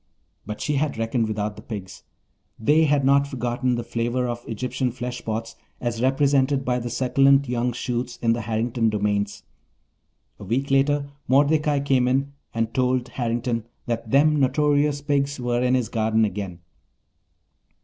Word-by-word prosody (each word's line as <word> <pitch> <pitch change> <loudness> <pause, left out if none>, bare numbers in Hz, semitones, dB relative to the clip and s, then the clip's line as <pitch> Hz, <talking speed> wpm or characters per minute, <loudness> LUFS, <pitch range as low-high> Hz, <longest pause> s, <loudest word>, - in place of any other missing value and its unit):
But 105 0 -5
she 150 -1 0
had 145 -3 -1
reckoned 115 0 0
without 105 -1 -2
the - - -9
pigs. 100 -4 -8 0.6
They 150 +8 +4
had 145 -2 +2
not 140 +1 +4
forgotten 125 -1 -1
the 120 - -3
flavour 120 +2 -1
of 120 0 -4
Egyptian 125 +3 -2
fleshpots 115 -2 -5 0.2
as 120 -1 -3
represented 135 +1 +2
by 125 0 +1
the 120 0 -4
succulent 135 +3 +3
young 125 0 0
shoots 120 0 -3
in 115 -1 +2
the 115 - -2
Harrington 115 +1 0
domains. 105 -1 -1 1.0
A - - -9
week 130 +8 -1
later 140 +1 +3 0.2
Mordecai 145 +1 +3
came 130 -3 +2
in 135 +2 0 0.2
and 115 0 -2
told 125 -1 +1
Harrington 120 -2 -2 0.2
that 115 -1 -3
"them 150 +4 +4
notorious 145 +1 +2
pigs" 140 -1 0
were 120 0 0
in 125 0 +3
his 125 -3 0
garden 110 0 +1
again. 95 -3 -5
125 Hz, 150 wpm, -24 LUFS, 115-140 Hz, 1.0 s, They